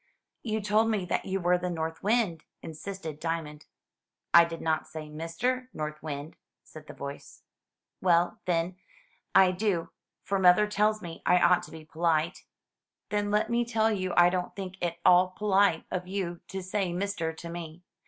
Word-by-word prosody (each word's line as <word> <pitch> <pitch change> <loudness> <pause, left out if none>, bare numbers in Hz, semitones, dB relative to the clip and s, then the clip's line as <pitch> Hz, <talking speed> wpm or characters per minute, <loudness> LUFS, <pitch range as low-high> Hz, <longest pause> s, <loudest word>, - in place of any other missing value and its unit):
"You 220 -2 -2
told 215 +2 +2
me 210 -5 0
that 180 - -1
you 195 0 -1
were 180 0 +2
the 180 0 -2
North 160 -1 -4
Wind," 205 -7 +1 0.2
insisted 160 -1 -7
Dia 165 0 -1
mond. 150 0 -12 0.7
"I 170 0 +9
did 165 0 -6
not 160 -1 -1
say 155 -1 -8
Mister 170 +12 -2
North 150 0 -5
Wind," 145 0 -6 0.3
said 155 - -13
the - - -10
voice. 140 0 -8 0.6
"Well, 175 -1 +2
then, 175 +1 0 0.6
I 190 -1 +7
do; 180 -3 -1 0.3
for 195 -1 -1
mother 185 +3 +6
tells 210 0 +1
me 165 -1 -8
I 180 - +4
ought 180 0 +4
to - - -16
be 160 -1 -10
polite." 165 +1 0 0.6
"Then 205 0 0
let 210 +3 +1
me 240 0 +2
tell 225 -1 +1
you 185 -3 -1
I 175 0 +7
don't 180 -1 -3
think 190 -1 -6
it - - +1
at - - -25
all 180 +1 +5
polite 200 -5 +3
of 180 0 -3
you 185 -3 -3
to 190 -1 -5
say 190 -1 -1
Mister 180 -2 -2
to 170 +1 -9
me. 170 0 -8
180 Hz, 180 wpm, -28 LUFS, 165-200 Hz, 0.7 s, I